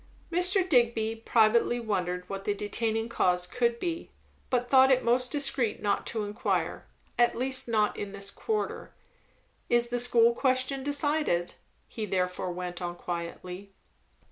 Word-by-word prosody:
Mr. 360 +2 +3
Digby 235 -6 +2
privately 230 +1 +2
wondered 180 -5 -2
what 195 0 -5
the 205 0 -1
detaining 225 +2 -2
cause 180 -6 +1
could 235 +4 0
be, 340 -1 -4 0.4
but 245 -1 0
thought 265 +1 +6
it 260 -1 +3
most 250 +1 +2
discreet 275 -6 0
not 205 -1 -1
to 220 -2 -2
inquire; 205 +1 -2 0.3
at 240 0 +3
least, 260 +1 0
not 215 -3 +1
in 205 -1 -5
this 200 0 -5
quarter. 435 -2 -3 0.7
"Is 240 0 +2
the 245 0 -1
school 235 -1 +4
question 260 +1 0
decided?" 285 - 0 0.3
he 220 -2 -5
therefore 180 -1 -1
went 180 0 -6
on 175 0 -4
quietly. 180 +3 -6
230 Hz, 145 wpm, -28 LUFS, 195-255 Hz, 0.7 s, thought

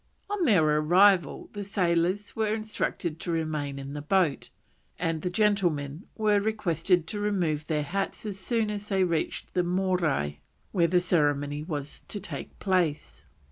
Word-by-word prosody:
On 405 -4 +1
their 195 - +5
arrival 175 +1 +4
the 205 -1 -4
sailors 185 0 0
were 220 -1 +1
instructed 210 -6 -3
to 175 - -3
remain 155 -4 -2
in 140 0 -6
the 145 - -4
boat, 165 -2 +1 0.5
and 165 -2 -1
the 180 - -1
gentlemen 175 -6 0
were 210 -2 +3
requested 180 -5 +1
to 205 +5 -5
remove 175 -8 0
their 150 -2 0
hats 195 +8 -3
as 200 -2 -4
soon 220 +1 0
as 210 0 -5
they 190 -2 +2
reached 170 -3 -2
the 180 - +2
Morai 175 - 0 0.3
where 170 -3 +3
the 180 +2 +3
ceremonial 145 -4 +1
was 145 -4 -5
to 205 - -5
take 200 - -7
place. 165 - -1
180 Hz, 155 wpm, -28 LUFS, 155-200 Hz, 0.5 s, their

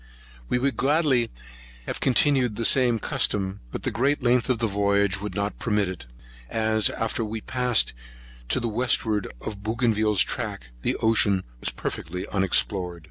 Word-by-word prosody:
We - - +2
would 130 -2 0
gladly 135 -5 +2 0.6
have - - -4
continued 130 -3 +3
the 115 - -2
same 125 -2 +4
custom; 100 -2 0
but - - -5
the - - -1
great 140 +3 +1
length 125 +1 +2
of 125 - +2
the 115 - 0
voyage 100 -1 +1
would 105 - -5
not 100 0 -2
permit 105 -5 +1
it, 90 -7 -7 0.4
as, 110 -1 +1
after 115 +1 -2
we 110 +1 -4
had 110 - -10
passed 125 -3 +1 0.6
to - - +2
the 120 - -2
wastward 110 -2 0
of 105 -2 -6
Bougainville's 110 -2 +2
track, - - -5
the - - 0
ocean 105 -4 +3 0.2
was - - 0
perfectly 90 +3 -5
unexplored. 95 -2 0
110 Hz, 160 wpm, -25 LUFS, 100-125 Hz, 0.6 s, same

